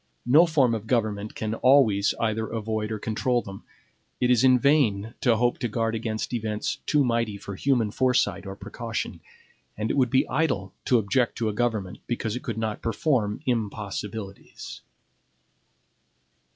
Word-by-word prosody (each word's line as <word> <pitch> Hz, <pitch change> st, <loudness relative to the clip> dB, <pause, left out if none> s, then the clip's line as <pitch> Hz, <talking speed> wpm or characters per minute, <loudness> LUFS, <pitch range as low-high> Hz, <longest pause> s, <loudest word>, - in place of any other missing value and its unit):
No 155 Hz, +8 st, +6 dB
form 140 Hz, -7 st, +3 dB
of 110 Hz, -1 st, -4 dB
government 110 Hz, -3 st, -1 dB
can 110 Hz, 0 st, -3 dB
always 115 Hz, -6 st, +4 dB
either 110 Hz, -1 st, 0 dB
avoid 110 Hz, -1 st, -3 dB
or 110 Hz, -, -2 dB
control 115 Hz, +3 st, 0 dB
them. 95 Hz, 0 st, -9 dB, 0.6 s
It 125 Hz, 0 st, +2 dB
is 125 Hz, 0 st, +4 dB
in 130 Hz, -1 st, +6 dB
vain 120 Hz, -6 st, +2 dB
to 120 Hz, -3 st, +4 dB
hope 120 Hz, +1 st, +1 dB
to 120 Hz, -, -1 dB
guard 115 Hz, 0 st, -1 dB
against 110 Hz, +1 st, -3 dB
events 110 Hz, -2 st, -2 dB
too 145 Hz, -2 st, +3 dB
mighty 115 Hz, -3 st, 0 dB
for 100 Hz, -, -8 dB
human 115 Hz, 0 st, +1 dB
foresight 125 Hz, -6 st, +1 dB
or 95 Hz, -, -6 dB
precaution, -, -, -5 dB, 0.6 s
and 110 Hz, +1 st, -1 dB
it -, -, -1 dB
would 130 Hz, -3 st, +3 dB
be 130 Hz, +1 st, +2 dB
idle 125 Hz, -, -1 dB
to 125 Hz, -, +4 dB
object 120 Hz, +3 st, +1 dB
to 115 Hz, -2 st, 0 dB
a -, -, -3 dB
government 105 Hz, -4 st, -2 dB
because 115 Hz, -2 st, -2 dB
it 125 Hz, -, -4 dB
could 115 Hz, -, -4 dB
not 110 Hz, -1 st, -3 dB
perform 115 Hz, -2 st, 0 dB
impossibilities. 105 Hz, -3 st, -4 dB
115 Hz, 160 wpm, -26 LUFS, 105-125 Hz, 0.6 s, No